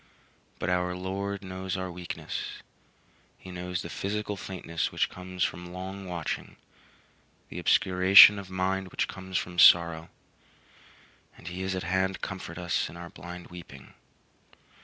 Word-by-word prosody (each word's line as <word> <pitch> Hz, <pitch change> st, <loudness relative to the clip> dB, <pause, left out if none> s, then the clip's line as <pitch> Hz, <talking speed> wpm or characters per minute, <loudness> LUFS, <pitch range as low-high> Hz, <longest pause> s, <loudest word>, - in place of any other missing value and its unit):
But 85 Hz, -, -2 dB
our 90 Hz, 0 st, 0 dB
Lord 100 Hz, +2 st, -4 dB
knows 95 Hz, 0 st, -4 dB
our 95 Hz, -1 st, -4 dB
weakness; 90 Hz, 0 st, -6 dB, 0.7 s
he 95 Hz, -, -11 dB
knows 90 Hz, 0 st, -4 dB
the -, -, -7 dB
physical 105 Hz, +1 st, -3 dB
faintness 90 Hz, -4 st, -4 dB
which -, -, 0 dB
comes 90 Hz, 0 st, -4 dB
from 90 Hz, 0 st, -3 dB
long 95 Hz, +1 st, -6 dB
watching, 85 Hz, -3 st, -4 dB, 0.9 s
the 90 Hz, -, -6 dB
obscuration 95 Hz, +2 st, +7 dB
of 95 Hz, -2 st, -9 dB
mind 95 Hz, +1 st, -1 dB
which -, -, -1 dB
comes 95 Hz, -1 st, -5 dB
from 90 Hz, 0 st, -3 dB
sorrow, 85 Hz, -1 st, +6 dB, 1.3 s
and 90 Hz, -, -8 dB
he 90 Hz, +1 st, -6 dB
is 95 Hz, 0 st, -2 dB
at 95 Hz, -, -3 dB
hand 95 Hz, +2 st, 0 dB
to -, -, -11 dB
comfort 95 Hz, -3 st, -6 dB
us 85 Hz, -1 st, -1 dB
in 85 Hz, -, -11 dB
our 85 Hz, -1 st, -9 dB
blind 90 Hz, +2 st, -10 dB
weeping. 80 Hz, -6 st, -11 dB
90 Hz, 145 wpm, -28 LUFS, 90-95 Hz, 1.3 s, obscuration